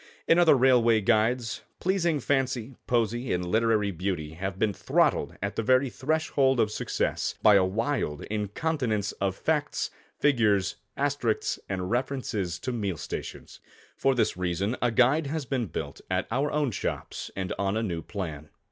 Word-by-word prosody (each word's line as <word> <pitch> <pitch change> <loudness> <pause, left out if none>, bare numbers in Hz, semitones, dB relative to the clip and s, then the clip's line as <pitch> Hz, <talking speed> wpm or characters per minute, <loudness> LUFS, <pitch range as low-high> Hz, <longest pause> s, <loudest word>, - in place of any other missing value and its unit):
In 165 - +5
other 170 -4 +6
Railway 120 -3 +5
Guides, 115 +2 +1 0.2
pleasing 175 -4 +1
fancy, 130 -2 -1
poesy 120 +1 0
and 90 0 0
literary 110 +1 +2
beauty, 90 -4 -3
have 95 +3 -4
been 105 0 +1
throttled - - +1
at 100 - -2
the - - 0
very 130 +3 +3
threshold 135 -2 +1
of 110 -2 +2
success, - - -1
by 105 - +8
a 100 -2 +6
wild 100 - -1
incontinence 110 +1 -1
of 95 -2 0
facts, - - -1 0.3
figures, 105 -9 +2 0.2
asterisks 140 -5 0
and 95 -1 -3
references 120 -8 -1
to 130 - -2
meal 100 -7 -2
stations. - - -7 0.4
For 135 0 +2
this 120 - +1
reason 90 +5 -1
a 120 - +3
guide 130 +6 +3
has 155 0 -3
been 125 -4 -1
built 80 - -6
at 95 0 0
our 135 +5 +1
own 145 -4 +1
shops - - -4
and 95 -1 -3
on 100 +1 0
a 115 - 0
new 85 -6 -2
plan. 80 -6 -6
115 Hz, 155 wpm, -27 LUFS, 100-130 Hz, 0.4 s, by